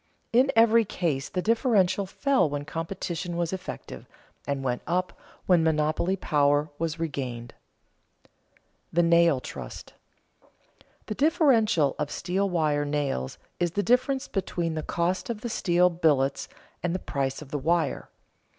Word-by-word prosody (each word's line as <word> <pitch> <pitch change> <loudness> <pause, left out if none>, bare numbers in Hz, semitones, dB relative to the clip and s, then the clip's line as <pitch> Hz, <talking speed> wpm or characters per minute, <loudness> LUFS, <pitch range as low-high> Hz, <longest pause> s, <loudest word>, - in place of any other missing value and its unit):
In 255 +3 +4
every 230 0 +6
case 165 -10 -2
the 180 - -2
differential 205 -5 +2
fell 265 - +1
when 145 0 -4
competition 170 +1 -4
was 170 0 -1
effective 180 - -7 0.4
and 140 -1 -2
went 125 -2 -1
up 180 +1 0 0.3
when 175 -3 +4
monopoly 160 +3 +1
power 145 -3 +1
was 165 0 -2
regained. 130 -7 -4 0.7
[Sidenote: - - -30 0.6
The 175 +1 +4
nail 170 -4 +4
trust] 65 - -9 1.1
The - - -4
differential 240 - +3
of 150 -1 -1
steel 190 +5 -1
wire 155 -4 +1
nails 145 - -2 0.2
is 175 -1 0
the 205 - 0
difference 260 +5 +1
between 175 -4 -2
the 155 - -2
cost 175 +7 -1
of 220 -3 -4
the 240 - -4
steel 180 -4 +2
billets 145 -5 +1 0.3
and 175 0 -1
the 185 - -5
price 135 +1 -2
of 140 - -15
the 145 - -2
wire. 160 +1 0
170 Hz, 140 wpm, -26 LUFS, 145-195 Hz, 1.1 s, every